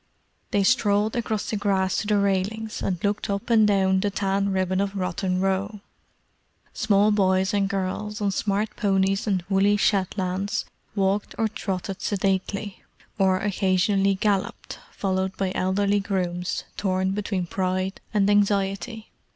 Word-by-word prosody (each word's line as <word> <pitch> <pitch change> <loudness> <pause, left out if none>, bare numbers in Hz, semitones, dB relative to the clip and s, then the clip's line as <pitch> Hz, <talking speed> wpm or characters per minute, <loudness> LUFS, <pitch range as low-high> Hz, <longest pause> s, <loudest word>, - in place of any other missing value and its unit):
They 200 -1 +2
strolled 210 -1 +2
across 220 -3 -2
the - - -1
grass 195 -2 +1
to 210 - -2
the 210 -1 +3
railings, 200 +3 -1
and 185 - -1
looked 205 0 -1
up 200 +4 -2
and 220 -2 +6
down 190 -2 +3
the 205 +1 0
tan 195 0 0
ribbon 185 0 0
of 200 0 -2
Rotten 185 0 -1
Row. 195 +2 -1 0.9
Small 210 0 +3
boys 190 -2 +2
and 200 -1 +1
girls, 200 +2 -3
on 205 -1 0
smart 205 +2 -1
ponies 195 -1 +1
and 185 -4 0
woolly 200 +1 +3
Shetlands, 195 -1 0 0.3
walked 200 0 0
or 225 - +2
trotted 195 -3 -4
sedately; 195 0 -1 0.4
or 190 -1 +4
occasionally 195 0 +2
galloped, 200 0 -2
followed 190 -1 -2
by 190 -1 -1
elderly 200 +2 +1
grooms 180 -3 -2
torn 190 -1 0
between 195 -2 -2
pride 185 +1 -2
and 200 -2 +2
anxiety. 205 +2 0
195 Hz, 140 wpm, -24 LUFS, 190-205 Hz, 0.9 s, and